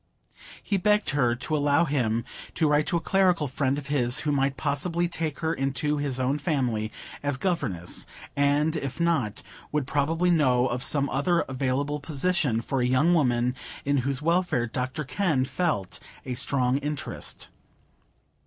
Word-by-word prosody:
He 200 - 0
begged 210 0 +2
her 125 -5 +2
to 155 +6 -1
allow 145 +2 +3
him 120 -6 0 0.3
to 160 - +2
write 150 0 +2
to 170 - +1
a - - -3
clerical 180 -4 +2
friend 135 +1 0
of 145 - -5
his, 130 -4 +1
who 150 - 0
might 135 -1 +1
possibly 165 +7 0
take 160 -3 -4
her 160 0 +1
into 135 +1 0
his 140 -3 -2
own 135 +3 0
family 125 -8 -1 0.3
as 145 -2 -1
governess; 105 - -2 0.3
and, 145 +3 +2
if 140 -2 -4
not, 160 -11 0 0.3
would 150 -3 0
probably 160 +6 +1
know 130 -7 +3
of 125 -1 -2
some 140 +1 +1
other 170 +6 +2
available 135 +3 -1
position 145 -4 0
for 130 +2 -1
a 125 - +2
young 145 +7 +3
woman 125 -5 +2 0.3
in 140 0 +2
whose 135 +2 -1
welfare 170 -7 +1
Dr 130 +6 -3
Kenn 140 -1 0
felt 150 - -2 0.3
a 130 - -3
strong 130 0 +2
interest. 150 0 -4
140 Hz, 160 wpm, -26 LUFS, 130-160 Hz, 0.3 s, allow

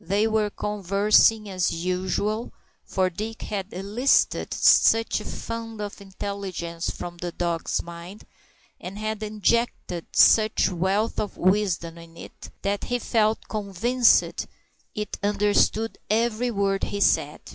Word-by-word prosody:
They 200 +5 +1
were 220 -1 +1
conversing 210 +2 +2
as 185 -2 0
usual, 185 +6 -2 0.3
for 185 -1 0
Dick 220 +5 -6
had 200 -1 -4
elicited 210 +9 +1
such 225 0 +4
a 210 - -9
fund 230 -1 -6
of 205 -1 -6
intelligence 190 -3 -5
from 175 0 -6
the 175 0 -5
dog's 170 -1 -2
mind, 170 +4 -10 0.5
and 190 +3 -8
had 215 0 -3
injected 215 -4 -1
such 215 -2 +5
wealth 190 +5 0
of 210 - -4
wisdom 180 -3 0
into 165 0 -13
it, - - -11
that 200 0 -1
he 245 - -1
felt 220 -2 0
convinced 220 +4 +3 0.7
it 210 -1 -4
understood 210 +2 +1
every 230 +2 +1
word 195 -3 0
he 205 - -4
said. - - +2
205 Hz, 125 wpm, -25 LUFS, 185-215 Hz, 0.7 s, such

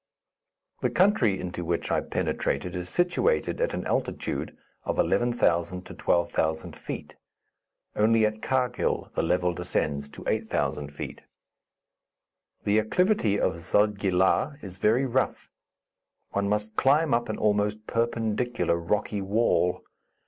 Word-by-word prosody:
The - - +2
country 145 - +3
into 90 -1 -4
which 85 0 -2
I - - +2
penetrated 90 -1 -2
is 90 0 -4
situated 400 - +1
at - - 0
an - - -4
altitude - - -2 0.3
of - - -2
11,000 90 -7 +1
to - - -9
12,000 80 -2 0
feet. - - -7 0.8
Only 110 +1 +4
at 110 0 -2
Karghil 125 -2 0
the - - 0
level 90 0 +1
descends 75 -5 -2
to - - -11
8,000 75 0 -1
feet. 75 - -7 1.4
The 105 +1 +3
acclivity 110 - +2
of 85 - 0
Zodgi 105 +3 +1
La 95 +10 +2
is 95 -2 -9
very 115 +7 +3
rough; 130 0 -1 0.8
one 100 0 0
must 105 +1 -1
climb 145 +2 +3
up 120 -1 +1
an 110 - -2
almost 105 0 +1
perpendicular 115 -3 0
rocky 100 +4 -1
wall. 95 -3 +1
105 Hz, 125 wpm, -27 LUFS, 90-120 Hz, 1.4 s, Only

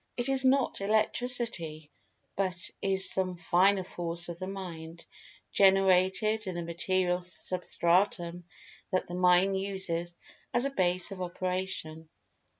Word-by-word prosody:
It 245 +2 -1
is 270 -1 +2
not 265 -4 +2
Electricity, 215 -7 -1 0.4
but 185 -3 -2
is 190 -1 +3
some 185 -2 -1
Finer 185 +3 +3
Force 175 -1 -5
of 170 0 -7
the 185 - -4
Mind, 170 -4 -7 0.5
generated 195 +2 +3
in 185 - -3
the 175 - -3
material 180 +2 0
substratum 175 +1 0 0.5
that 185 - +1
the 175 - -9
Mind 180 +2 +4
uses 180 -3 -3 0.4
as 240 +2 +2
a 275 - -1
base 185 -4 0
of 190 -1 -6
operation. 180 -3 -4
185 Hz, 125 wpm, -30 LUFS, 175-195 Hz, 0.5 s, Mind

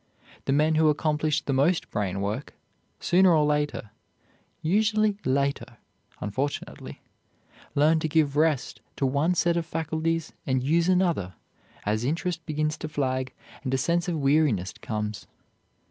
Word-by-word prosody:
The - - 0
men 150 +3 +3
who 160 - +5
accomplish 150 0 0
the 140 - -1
most 150 +7 +1
brain 100 -1 -2
work, 105 +8 -4 0.4
sooner 180 0 +4
or 150 -1 +3
later 150 -7 -1 0.7
usually 210 +3 +2
later, 135 -3 -1 0.4
unfortunately 130 +8 -4 0.7
learn 155 +3 +4
to 155 - -1
give 150 -2 +2
rest 150 -3 +1
to 140 - 0
one 145 +7 +1
set 170 -1 +2
of 170 - -1
faculties 160 0 -2
and 130 -1 +1
use 165 +5 +2
another, 170 - +1 0.5
as 110 +2 0
interest 165 +4 -2
begins 155 0 -1
to 155 - -5
flag 130 -3 -1 0.3
and 130 - -2
a - - +2
sense 170 +6 0
of 170 -2 -1
weariness 135 - +2
comes. 105 -2 -4
150 Hz, 140 wpm, -26 LUFS, 130-165 Hz, 0.7 s, who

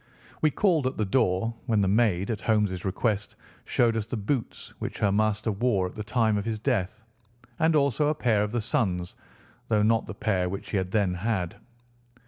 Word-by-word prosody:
We 155 - +4
called 160 -4 +2
at 130 - -3
the 110 - 0
door, 110 0 +1
when 110 -3 +2
the 95 - +2
maid, 100 -2 +2
at 110 - -3
Holmes' 105 -5 +1
request, 105 +1 -1 0.3
showed 115 -2 +2
us 110 -1 -2
the 120 - -3
boots 110 +4 -3
which - - -5
her 100 - +2
master 110 +1 +1
wore 100 -2 +1
at 90 - -5
the 105 - -4
time 110 -1 +1
of 100 - -5
his 115 -1 -2
death, 110 -3 -1 0.6
and 160 0 +3
also 140 0 +2
a 155 - +1
pair 115 -7 +2
of 105 0 -1
the 120 0 -1
son's, 90 -5 -1 0.5
though 105 -2 +2
not 115 +1 +2
the - - -7
pair 95 -6 0
which 100 +2 -6
he 105 - +1
had 95 -1 -1
then 100 -2 +1
had. 90 -2 -2
110 Hz, 200 wpm, -27 LUFS, 100-120 Hz, 0.6 s, We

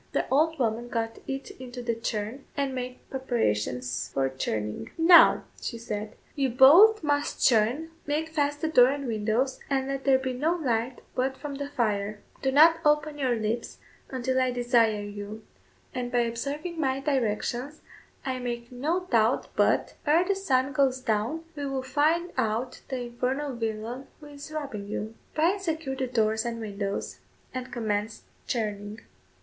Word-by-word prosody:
The - - 0
old 320 +4 +3
woman 235 -1 -1
got 225 -1 -2
it 270 0 -4
into 250 -1 -7
the 235 -1 0
churn, 230 +3 -4
and 275 -1 0
made 250 0 -6
preparations 125 - -1
for 135 -1 +1
churning. 105 -5 -3
"Now," 340 +1 +7 0.2
she 235 - -4
said, 215 -2 -5 0.2
"you 275 -3 +1
both 330 - +7
must 290 -1 0
churn, 245 +8 +3 0.2
make 305 +2 -1
fast 290 -2 -1
the 320 - +1
door 250 -6 +7
and 280 +1 -2
windows, 230 +3 0
and 270 -1 0
let 275 0 -3
there 270 -1 +5
be 260 -1 -3
no 305 +7 +1
light 245 -5 -1
but 265 +1 -1
from 295 -1 -6
the 280 +1 -5
fire; 210 -5 -1 0.2
do 265 - +1
not 320 +4 +7
open 300 0 +2
your 255 -3 +2
lips 225 +1 -3 0.3
until 260 0 0
I 255 - +2
desire 240 -4 +2
you, 205 +1 -7 0.5
and 245 -1 -3
by 245 0 +3
observing 285 +9 -3
my 265 -3 +1
directions, 265 +1 -1 0.4
I 260 -1 -2
make 240 -1 -4
no 300 +9 -1
doubt 235 -9 +2
but, - - +2
ere 325 +4 +4
the 395 - +3
sun 275 -9 +1
goes 270 -3 +2
down, 230 +7 -1
we 285 -1 -3
will 270 -1 -2
find 310 +6 +1
out 240 +1 -1
the 260 -2 -2
infernal 255 +4 -2
villain 225 +3 -4
who 300 - -13
is 290 +1 -10
robbing 275 -10 -5
you." 215 +1 -4 0.2
Bryan 345 +6 +2
secured 315 -7 -3
the 260 - 0
doors 220 -2 +1
and 235 -1 -3
windows, 200 -2 -4 0.3
and 255 0 -5
commenced 215 -2 -2 0.2
churning. 210 -2 -3
255 Hz, 165 wpm, -27 LUFS, 225-285 Hz, 0.5 s, Now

